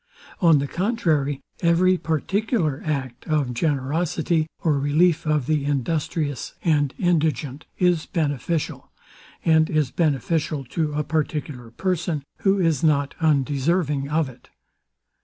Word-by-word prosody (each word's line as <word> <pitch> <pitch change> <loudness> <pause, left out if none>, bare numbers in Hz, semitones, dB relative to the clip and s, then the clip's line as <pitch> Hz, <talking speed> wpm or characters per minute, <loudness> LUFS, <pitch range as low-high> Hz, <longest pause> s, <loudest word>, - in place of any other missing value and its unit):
On 165 -6 +5
the 140 - 0
contrary, 160 - 0 0.2
every 180 +2 +4
particular 170 - -1
act 130 -5 -4
of 150 -6 0
generosity, 155 +4 0 0.2
or 150 -4 +2
relief 155 +4 +2
of 150 -4 +1
the 150 0 +1
industrious 145 0 -2
and 145 -4 +2
indigent, 155 - 0
is 175 -3 +2
beneficial; 155 -1 -2 0.5
and 160 -1 +4
is 155 -5 +1
beneficial 155 -1 0
to 150 +4 -2
a 150 +1 0
particular 150 -5 -3
person, 170 +2 -2 0.2
who 195 0 +2
is 165 -6 +1
not 145 -3 +2
undeserving 145 0 +1
of 155 0 +1
it. 130 - -14
155 Hz, 120 wpm, -23 LUFS, 140-170 Hz, 0.5 s, On